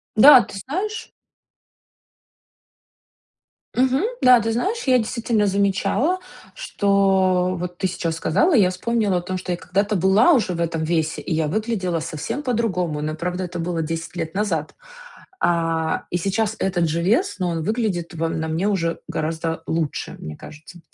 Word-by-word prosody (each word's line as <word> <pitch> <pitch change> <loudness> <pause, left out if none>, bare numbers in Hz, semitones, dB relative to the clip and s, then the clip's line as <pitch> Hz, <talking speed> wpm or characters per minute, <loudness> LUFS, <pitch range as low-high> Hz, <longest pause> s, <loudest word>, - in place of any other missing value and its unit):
Да, 255 +4 +9
ты - - -9
знаешь 385 - -4 2.6
Мгм. 260 +4 +2 0.2
Да, 250 -1 +7
ты 225 0 -1
знаешь, 390 - -1
я, 255 -2 +4
действительно, 225 -2 0
замечала, 200 - +1 0.3
что, 190 - +1
вот 180 0 -6
ты 190 - +1
сейчас 165 -2 -3
сказала, 290 - +2
и 220 - +6
я 180 - +4
вспомнила 205 +1 0
о - - -1
том, 185 +1 -4
что 180 - -5
я 175 - -1
когда-то 200 +4 -1
была 195 - +4
уже 220 - +1
в 170 - -3
этом 165 -1 -1
весе 160 -1 -1
и 175 - -2
я 160 -1 0
выглядела 190 -2 -1
совсем 165 - -4
по-другому. 185 - -1
Но 155 +1 -3
правда 180 +3 -3
это 175 0 -7
было 170 0 -2
10 165 +2 -5
лет 165 0 -4
назад. 175 -7 -1 0.7
А, 165 -1 0
и 175 - -1
сейчас 200 +4 -1
этот 175 -3 0
же 165 +2 -1
вес, 235 - +2
но 180 -1 0
он 165 -1 -2
выглядит 210 -5 -2
во 165 0 -2
на 160 0 -3
мне 165 +5 -1
уже 170 -5 -1
гораздо 160 +1 -3
лучше, 160 -2 -2
мне 75 -1 -8
кажется. 155 +3 -12
185 Hz, 165 wpm, -22 LUFS, 165-220 Hz, 2.6 s, Да